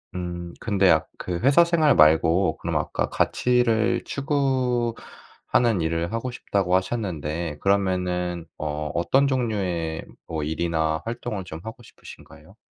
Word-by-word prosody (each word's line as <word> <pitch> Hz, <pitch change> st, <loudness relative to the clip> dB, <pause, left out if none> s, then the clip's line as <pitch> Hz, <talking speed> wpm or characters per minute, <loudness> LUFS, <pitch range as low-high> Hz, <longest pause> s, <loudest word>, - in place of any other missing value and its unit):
음. 85 Hz, -1 st, -5 dB
근데 100 Hz, -4 st, +2 dB
아 -, -, +3 dB
그 90 Hz, -2 st, -4 dB
회사 140 Hz, +6 st, +5 dB
생활 165 Hz, -4 st, +3 dB
말고 80 Hz, +2 st, +4 dB
그럼 -, -, -4 dB
아까 -, -, -2 dB
가치를 120 Hz, -2 st, +1 dB
추구하는 125 Hz, -, -1 dB
일을 85 Hz, +2 st, -1 dB
하고 115 Hz, +2 st, -3 dB
싶다고 95 Hz, -6 st, 0 dB
하셨는데 85 Hz, -6 st, -2 dB
그러면은 90 Hz, -3 st, 0 dB
어 75 Hz, 0 st, -3 dB
어떤 135 Hz, +11 st, +2 dB
종류의 95 Hz, -11 st, -2 dB, 0.2 s
뭐 80 Hz, -2 st, -3 dB
일이나 80 Hz, 0 st, -1 dB
활동을 115 Hz, -4 st, -4 dB
좀 80 Hz, 0 st, -8 dB
하고 115 Hz, +2 st, -8 dB
싶으신가요? -, -, -15 dB
95 Hz, 275 characters per minute, -24 LUFS, 85-120 Hz, 0.2 s, 회사